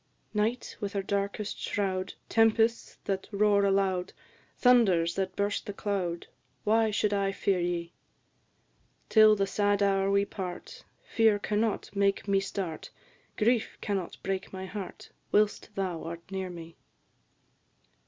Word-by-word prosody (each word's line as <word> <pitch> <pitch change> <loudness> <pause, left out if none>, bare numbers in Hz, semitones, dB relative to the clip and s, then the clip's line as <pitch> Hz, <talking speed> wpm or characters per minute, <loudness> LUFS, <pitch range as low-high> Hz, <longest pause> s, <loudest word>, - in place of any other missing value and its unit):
Night, 225 +3 -1
with 200 -1 -4
her 200 -1 -1
darkest 200 +1 -2
shroud, 190 -2 -2
Tempests 225 +1 +2
that 190 -1 -3
roar 205 0 +3
aloud, 195 -2 +1 0.4
Thunders 195 -10 +4
that 190 -1 -2
burst 200 0 -1
the 205 - -4
cloud, 190 -5 -2 0.4
Why 220 +1 +3
should 210 0 +1
I 200 -1 +1
fear 195 -1 0
ye? 175 -1 -2 1.2
Till 215 -1 +7
the 200 -1 +1
sad 205 0 +1
hour 195 -1 +2
we 200 0 +3
part, 180 -3 -7 0.2
Fear 220 -2 +3
cannot 210 0 -1
make 200 0 +1
me 195 -1 +3
start; 190 -4 -4 0.5
Grief 230 +1 +1
cannot 195 -4 -3
break 195 0 -3
my 190 0 -6
heart 190 0 -8 0.2
Whilst 210 0 +2
thou 185 -4 -2
art 170 +2 -8
near 190 -1 -3
me. 170 -1 -10
200 Hz, 135 wpm, -29 LUFS, 190-210 Hz, 1.2 s, Till